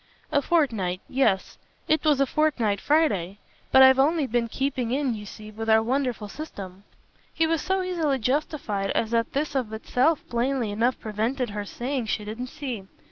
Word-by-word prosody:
"A 285 Hz, -2 st, +3 dB
fortnight, 225 Hz, -, +1 dB
yes 220 Hz, -8 st, 0 dB, 0.3 s
it 310 Hz, -, +2 dB
was 300 Hz, -3 st, +3 dB
a 275 Hz, -, +4 dB
fortnight 250 Hz, -9 st, +1 dB
Friday; 205 Hz, -, +1 dB, 0.3 s
but 265 Hz, -, +8 dB
I've 265 Hz, 0 st, +7 dB
only 305 Hz, +2 st, +3 dB
been, 240 Hz, -1 st, 0 dB
keeping 260 Hz, 0 st, -2 dB
in, 265 Hz, 0 st, 0 dB
you 210 Hz, -1 st, -7 dB
see, 215 Hz, +2 st, -10 dB
with 225 Hz, +1 st, -5 dB
our 220 Hz, 0 st, +5 dB
wonderful 250 Hz, -3 st, -1 dB
system." 200 Hz, -8 st, -9 dB, 0.5 s
He 325 Hz, -, +1 dB
was 325 Hz, -1 st, 0 dB
so 380 Hz, 0 st, 0 dB
easily 330 Hz, -7 st, 0 dB
justified 250 Hz, -6 st, -1 dB
as 225 Hz, -, 0 dB
that 230 Hz, 0 st, 0 dB
this 290 Hz, +2 st, -1 dB
of 255 Hz, -6 st, -1 dB
itself 255 Hz, +7 st, +1 dB
plainly 240 Hz, -1 st, 0 dB
enough 235 Hz, +5 st, +1 dB
prevented 225 Hz, +3 st, -2 dB
her 205 Hz, 0 st, -4 dB
saying 250 Hz, +3 st, -3 dB
she 210 Hz, -1 st, -2 dB
didn't 225 Hz, +4 st, -5 dB
see. 255 Hz, -9 st, -6 dB
250 Hz, 175 wpm, -25 LUFS, 215-285 Hz, 0.5 s, but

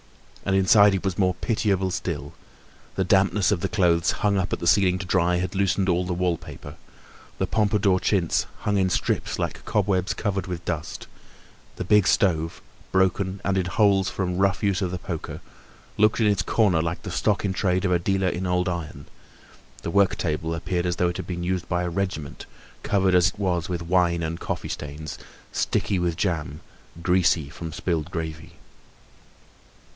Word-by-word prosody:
And 95 Hz, -, +1 dB
inside 100 Hz, +1 st, +6 dB
it 95 Hz, -, -4 dB
was 95 Hz, -1 st, -1 dB
more 90 Hz, -2 st, +2 dB
pitiable 95 Hz, -2 st, 0 dB
still; 75 Hz, -6 st, -4 dB, 0.6 s
the 95 Hz, -, +1 dB
dampness 95 Hz, +1 st, +3 dB
of 100 Hz, -, +1 dB
the 95 Hz, -, -2 dB
clothes 85 Hz, -3 st, +2 dB, 0.2 s
hung 100 Hz, -1 st, +3 dB
up 95 Hz, -2 st, -1 dB
at -, -, 0 dB
the -, -, -4 dB
ceiling 90 Hz, 0 st, +4 dB
to 95 Hz, -, -6 dB
dry 90 Hz, -1 st, +2 dB
had 90 Hz, +1 st, -2 dB
loosed 95 Hz, 0 st, +1 dB
all 90 Hz, -1 st, +2 dB
the 90 Hz, -, -2 dB
wallpaper; 90 Hz, -2 st, -3 dB, 0.6 s
the -, -, 0 dB
Pompadour 105 Hz, -3 st, +2 dB
chintz 90 Hz, -5 st, +1 dB
hung 105 Hz, -1 st, 0 dB
in 95 Hz, -1 st, +2 dB
strips -, -, -1 dB
like -, -, -3 dB
cobwebs 95 Hz, -2 st, 0 dB
covered 95 Hz, -3 st, -2 dB
with 90 Hz, -2 st, -5 dB
dust; 80 Hz, -2 st, -4 dB, 0.7 s
the -, -, -4 dB
big 105 Hz, 0 st, +4 dB
stove, 80 Hz, -4 st, +1 dB, 0.3 s
broken 95 Hz, +1 st, +1 dB
and 95 Hz, -1 st, +1 dB
in 90 Hz, -, -1 dB
holes 95 Hz, +1 st, +3 dB
from 90 Hz, -2 st, -2 dB
the 90 Hz, -, -3 dB
rough 100 Hz, +2 st, +1 dB
use 100 Hz, -1 st, +1 dB
of 95 Hz, -, 0 dB
the 90 Hz, -, -4 dB
poker, 85 Hz, -2 st, -6 dB, 0.6 s
looked 110 Hz, +2 st, +3 dB
in 115 Hz, -, +3 dB
its 100 Hz, -4 st, +3 dB
corner 90 Hz, -2 st, +2 dB
like 85 Hz, +1 st, -3 dB
the -, -, -5 dB
stock -, -, 0 dB
in 95 Hz, -, 0 dB
trade 95 Hz, 0 st, 0 dB
of 90 Hz, -, +1 dB
a 90 Hz, -, +3 dB
dealer 95 Hz, +2 st, 0 dB
in 90 Hz, +1 st, -2 dB
old 90 Hz, +1 st, +1 dB
iron; 80 Hz, -5 st, -5 dB, 0.8 s
the 85 Hz, -, -3 dB
work 100 Hz, 0 st, +3 dB
table 80 Hz, 0 st, -2 dB
appeared 90 Hz, +1 st, -2 dB
as 90 Hz, -, 0 dB
though 90 Hz, 0 st, +1 dB
it 90 Hz, -, -4 dB
had -, -, -6 dB
been 85 Hz, -1 st, -4 dB
used 90 Hz, -1 st, -2 dB
by 90 Hz, 0 st, 0 dB
a 90 Hz, -, -1 dB
regiment, 85 Hz, -5 st, -4 dB, 0.3 s
covered 95 Hz, -2 st, +1 dB
as 90 Hz, 0 st, +5 dB
it 95 Hz, -, -4 dB
was 90 Hz, -3 st, -1 dB
with 85 Hz, -1 st, -3 dB
wine 85 Hz, -1 st, +2 dB
and 80 Hz, +1 st, -3 dB
coffee -, -, -4 dB
stains, 75 Hz, +1 st, -6 dB, 0.3 s
sticky 95 Hz, -, 0 dB
with 85 Hz, -2 st, -1 dB
jam, 80 Hz, -5 st, -2 dB, 0.4 s
greasy 90 Hz, -5 st, +2 dB
from 80 Hz, +1 st, -7 dB
spilled 85 Hz, -1 st, -2 dB
gravy. 80 Hz, -1 st, -6 dB
90 Hz, 185 wpm, -24 LUFS, 85-95 Hz, 0.8 s, inside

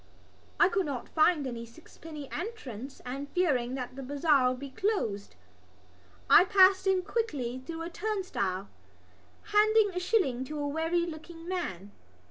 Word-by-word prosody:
I -, -, +7 dB
could 390 Hz, -7 st, 0 dB
not 265 Hz, -4 st, -4 dB
find 310 Hz, -2 st, +3 dB
any 235 Hz, -3 st, -5 dB
sixpenny 300 Hz, +4 st, -11 dB
entrance 275 Hz, -, -6 dB
and, 275 Hz, +3 st, -5 dB
fearing 265 Hz, -8 st, +1 dB
that 255 Hz, -1 st, -5 dB
the 275 Hz, -, -6 dB
bazaar 280 Hz, -1 st, +3 dB
would 250 Hz, 0 st, -3 dB
be 280 Hz, -1 st, -7 dB
closed, 260 Hz, -, -2 dB, 0.9 s
I -, -, +8 dB
passed 380 Hz, -1 st, +5 dB
in 375 Hz, -1 st, +3 dB
quickly 290 Hz, -, -2 dB
through 330 Hz, -1 st, -5 dB
a 335 Hz, -, -5 dB
turnstile, 255 Hz, -, -2 dB, 0.9 s
handing 425 Hz, 0 st, +5 dB
a 360 Hz, -, -3 dB
shilling 355 Hz, -, +1 dB
to 300 Hz, +3 st, -6 dB
a 290 Hz, -, -1 dB
weary 325 Hz, +3 st, 0 dB
looking 330 Hz, +1 st, -9 dB
man. 205 Hz, -, -4 dB
310 Hz, 145 wpm, -29 LUFS, 255-370 Hz, 0.9 s, I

